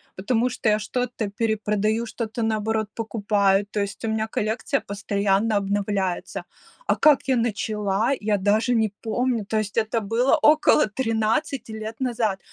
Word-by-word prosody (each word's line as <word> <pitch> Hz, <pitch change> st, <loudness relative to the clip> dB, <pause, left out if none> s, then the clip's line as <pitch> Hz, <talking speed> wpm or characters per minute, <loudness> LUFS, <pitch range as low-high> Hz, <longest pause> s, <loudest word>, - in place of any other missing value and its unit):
потому 230 Hz, +5 st, 0 dB
что 240 Hz, -2 st, -1 dB
я 210 Hz, 0 st, +3 dB
что-то 240 Hz, -1 st, -3 dB
перепродаю, 220 Hz, +1 st, 0 dB
что-то, 225 Hz, +1 st, -4 dB
наоборот, 220 Hz, -1 st, 0 dB
покупаю, 205 Hz, -3 st, +1 dB
то 210 Hz, -, -3 dB
есть 200 Hz, -1 st, -4 dB
у -, -, -1 dB
меня 220 Hz, 0 st, -1 dB
коллекция 220 Hz, +6 st, -1 dB
постоянно 200 Hz, +1 st, 0 dB
обновляется. 200 Hz, -2 st, -2 dB, 0.4 s
А -, -, +3 dB
как 300 Hz, -3 st, +4 dB
я 265 Hz, -, +3 dB
начала, 210 Hz, -1 st, 0 dB
я 210 Hz, -1 st, +1 dB
даже 210 Hz, +5 st, +2 dB
не 220 Hz, -3 st, +2 dB
помню. 235 Hz, -1 st, -1 dB
То 220 Hz, -, -1 dB
есть 210 Hz, 0 st, -4 dB
это 225 Hz, 0 st, +1 dB
было 230 Hz, +6 st, +2 dB
около 300 Hz, -2 st, +5 dB
13 225 Hz, +3 st, -1 dB
лет 220 Hz, +1 st, -6 dB
назад. 230 Hz, -6 st, -1 dB
220 Hz, 150 wpm, -24 LUFS, 205-230 Hz, 0.4 s, около